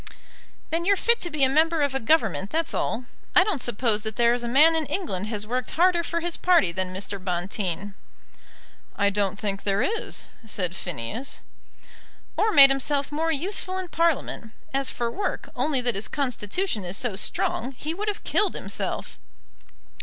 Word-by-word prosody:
"Then 330 Hz, +1 st, 0 dB
you're 400 Hz, +3 st, +4 dB
fit 470 Hz, +4 st, +3 dB
to 345 Hz, -, -2 dB
be 300 Hz, -3 st, 0 dB
a -, -, +7 dB
member 315 Hz, +3 st, +3 dB
of 285 Hz, -2 st, 0 dB
a 270 Hz, -, 0 dB
Government, 220 Hz, -, +1 dB
that's 325 Hz, +5 st, -1 dB
all. 240 Hz, +3 st, -2 dB, 0.3 s
I 365 Hz, -, +8 dB
don't 375 Hz, -, -1 dB
suppose 230 Hz, -2 st, 0 dB
that 220 Hz, 0 st, -5 dB
there 235 Hz, 0 st, +3 dB
is 245 Hz, -, -2 dB
a 240 Hz, -, -4 dB
man 300 Hz, +7 st, +6 dB
in 320 Hz, -2 st, 0 dB
England 210 Hz, -, -3 dB
has 210 Hz, -2 st, -3 dB
worked 250 Hz, +2 st, -2 dB
harder 350 Hz, 0 st, +4 dB
for 335 Hz, 0 st, -3 dB
his 345 Hz, 0 st, -2 dB
party 345 Hz, -, +3 dB
than 185 Hz, +1 st, -1 dB
Mr. 195 Hz, +1 st, -4 dB
Bonteen." 185 Hz, +1 st, -3 dB, 1.0 s
"I 200 Hz, 0 st, +2 dB
don't 200 Hz, -1 st, 0 dB
think 200 Hz, -1 st, -3 dB
there 200 Hz, 0 st, +1 dB
is," 445 Hz, +1 st, -3 dB, 0.2 s
said 185 Hz, -5 st, -2 dB
Phineas. 180 Hz, -, -6 dB, 0.9 s
"Or 435 Hz, +1 st, +2 dB
made 275 Hz, -7 st, +9 dB
himself 280 Hz, +1 st, 0 dB
more 320 Hz, +2 st, 0 dB
useful 370 Hz, +4 st, 0 dB
in 370 Hz, -2 st, -5 dB
Parliament. 320 Hz, -9 st, -1 dB, 0.2 s
As 275 Hz, 0 st, +2 dB
for 235 Hz, -1 st, -2 dB
work, 405 Hz, -, -3 dB
only 280 Hz, -5 st, +1 dB
that 240 Hz, -1 st, +1 dB
his 200 Hz, +2 st, -2 dB
constitution 255 Hz, -, -2 dB
is 180 Hz, +2 st, -2 dB
so 240 Hz, -6 st, 0 dB
strong, 245 Hz, +5 st, -1 dB
he 300 Hz, +5 st, -5 dB
would 410 Hz, +5 st, -5 dB
have 415 Hz, 0 st, -3 dB
killed 420 Hz, -, +2 dB
himself." -, -, -4 dB
255 Hz, 180 wpm, -25 LUFS, 205-330 Hz, 1.0 s, made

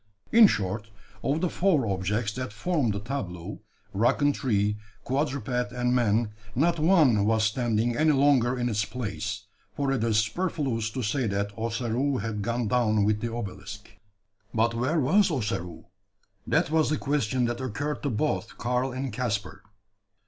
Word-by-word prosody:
In 225 Hz, -1 st, +9 dB
short, 105 Hz, -, -2 dB, 0.3 s
of 145 Hz, +4 st, 0 dB
the 180 Hz, -, +1 dB
four 170 Hz, -9 st, +2 dB
objects 105 Hz, +2 st, -1 dB
that 130 Hz, -2 st, -4 dB
formed 125 Hz, -, 0 dB
the 100 Hz, -, -3 dB
tableau 105 Hz, -6 st, -5 dB, 0.3 s
rock 110 Hz, +5 st, +2 dB
and 145 Hz, 0 st, +3 dB
tree, 105 Hz, -6 st, 0 dB, 0.3 s
quadruped 125 Hz, -3 st, -1 dB
and 125 Hz, 0 st, 0 dB
man 115 Hz, -2 st, +2 dB, 0.2 s
not 165 Hz, +6 st, +2 dB
one 155 Hz, -, +4 dB
was 110 Hz, +1 st, +2 dB
standing 115 Hz, +1 st, +1 dB
any 155 Hz, +3 st, +3 dB
longer 135 Hz, -3 st, +3 dB
in 120 Hz, 0 st, 0 dB
its 105 Hz, -3 st, 0 dB
place 105 Hz, -1 st, -4 dB, 0.3 s
for 140 Hz, -1 st, 0 dB
it 130 Hz, -5 st, 0 dB
is 115 Hz, -2 st, +2 dB
superfluous 120 Hz, -2 st, -1 dB
to 125 Hz, +3 st, -4 dB
say 120 Hz, +3 st, 0 dB
that 100 Hz, 0 st, -2 dB
Ossaroo 115 Hz, +4 st, -1 dB
had 105 Hz, -1 st, -3 dB
gone 115 Hz, +2 st, -1 dB
down 110 Hz, -2 st, +2 dB
with 105 Hz, +1 st, +1 dB
the 115 Hz, -, -2 dB
obelisk. 105 Hz, -2 st, -7 dB, 0.7 s
But 115 Hz, +1 st, +2 dB
where 130 Hz, +8 st, 0 dB
was 190 Hz, +9 st, +4 dB
Ossaroo? 95 Hz, -, -3 dB, 0.6 s
That -, -, +1 dB
was 160 Hz, -1 st, +3 dB
the 155 Hz, -, +1 dB
question 130 Hz, -4 st, 0 dB
that 120 Hz, +1 st, -2 dB
occurred 145 Hz, +4 st, -3 dB
to 145 Hz, -, -1 dB
both 115 Hz, -1 st, -2 dB
Karl 125 Hz, +2 st, -1 dB
and 130 Hz, -2 st, -4 dB
Caspar. 110 Hz, -4 st, -3 dB
120 Hz, 160 wpm, -27 LUFS, 105-135 Hz, 0.7 s, In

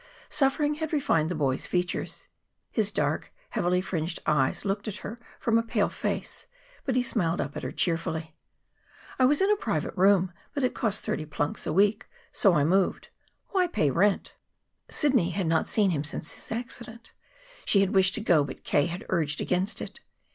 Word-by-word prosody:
Suffering 295 Hz, +1 st, +2 dB
had 315 Hz, 0 st, -3 dB
refined 165 Hz, -, +2 dB
the 180 Hz, -, -2 dB
boy's 135 Hz, -3 st, 0 dB
features. 180 Hz, -1 st, -2 dB, 0.4 s
His -, -, +2 dB
dark, -, -, -1 dB, 0.2 s
heavily 180 Hz, +1 st, +1 dB
fringed 170 Hz, -2 st, -2 dB
eyes 145 Hz, +3 st, +1 dB
looked 200 Hz, +1 st, -2 dB
at 210 Hz, -, -3 dB
her 225 Hz, +4 st, -6 dB, 0.2 s
from 230 Hz, -1 st, +2 dB
a -, -, +2 dB
pale 230 Hz, -, 0 dB
face. -, -, -4 dB, 0.4 s
But 260 Hz, -, 0 dB
he 250 Hz, -, +3 dB
smiled 175 Hz, -8 st, 0 dB
up 140 Hz, -, -3 dB
at -, -, -4 dB
her -, -, -4 dB
cheerfully. 160 Hz, -2 st, -1 dB, 0.9 s
"I 255 Hz, -, +6 dB
was 290 Hz, +5 st, +4 dB
in 390 Hz, +2 st, +4 dB
a -, -, +5 dB
private 190 Hz, -, -2 dB
room; 190 Hz, -1 st, +4 dB, 0.2 s
but 280 Hz, -, -1 dB
it 255 Hz, -, +1 dB
cost 215 Hz, -3 st, -1 dB
thirty 155 Hz, -, -2 dB
plunks 145 Hz, -1 st, -2 dB
a -, -, 0 dB
week, 205 Hz, +5 st, +2 dB, 0.2 s
so 195 Hz, -4 st, +4 dB
I 145 Hz, -, +3 dB
moved. 185 Hz, +5 st, +1 dB, 0.4 s
Why 370 Hz, -2 st, +2 dB
pay 150 Hz, -, +1 dB
rent?" 195 Hz, +7 st, +1 dB, 0.6 s
Sidney 255 Hz, -, +2 dB
had 185 Hz, +1 st, -2 dB
not 160 Hz, 0 st, +1 dB
seen 205 Hz, -4 st, +2 dB
him 145 Hz, -4 st, -1 dB
since 155 Hz, +1 st, -2 dB
his -, -, -9 dB
accident. 230 Hz, 0 st, -6 dB, 0.5 s
She 200 Hz, -, +4 dB
had 195 Hz, -1 st, +1 dB
wished 190 Hz, 0 st, +5 dB
to 220 Hz, -, -1 dB
go, 175 Hz, -8 st, +4 dB
but 140 Hz, -, -8 dB
K. 145 Hz, +2 st, +2 dB
had 175 Hz, +2 st, -6 dB
urged 155 Hz, -5 st, 0 dB
against 185 Hz, +4 st, 0 dB
it. -, -, -8 dB
190 Hz, 185 wpm, -27 LUFS, 165-230 Hz, 0.9 s, I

